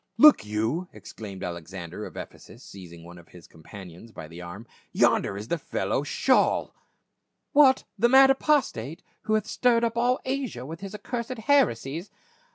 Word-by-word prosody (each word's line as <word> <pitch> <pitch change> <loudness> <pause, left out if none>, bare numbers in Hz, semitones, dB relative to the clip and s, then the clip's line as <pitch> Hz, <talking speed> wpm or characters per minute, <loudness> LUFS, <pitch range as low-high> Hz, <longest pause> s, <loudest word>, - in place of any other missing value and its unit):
" - - -47
Look 300 - +5
you," 110 +12 -2
exclaimed 100 -4 -9
Alexander* 90 +2 -7
of - - -13
Ephesus - - -11
seizing 85 -3 -12
one 85 +1 -12
of 85 - -18
his 90 -3 -15
companions 90 +5 -13
by 80 -7 -9
the 85 +2 -11
arm. 90 +6 -9 0.2
" - - -36
Yonder 100 - +3
is 105 +2 -8
the 170 - -1
fellow - - -2
Shaijl - - +1 0.3
!" - - -53
" - - -54
What, 280 -3 +5 0.2
the 235 - +4
mad 270 +1 +7
apostate, 265 - 0 0.2
who 215 - +1
hath 215 -1 0
stirred 235 +1 +2
up 230 -1 0
all 250 +2 +2
Asia 260 - -3
with 165 +4 -8
his 195 +1 -8
accursed 240 +3 -5
heresies 200 - +1
135 Hz, 175 wpm, -26 LUFS, -, 0.3 s, mad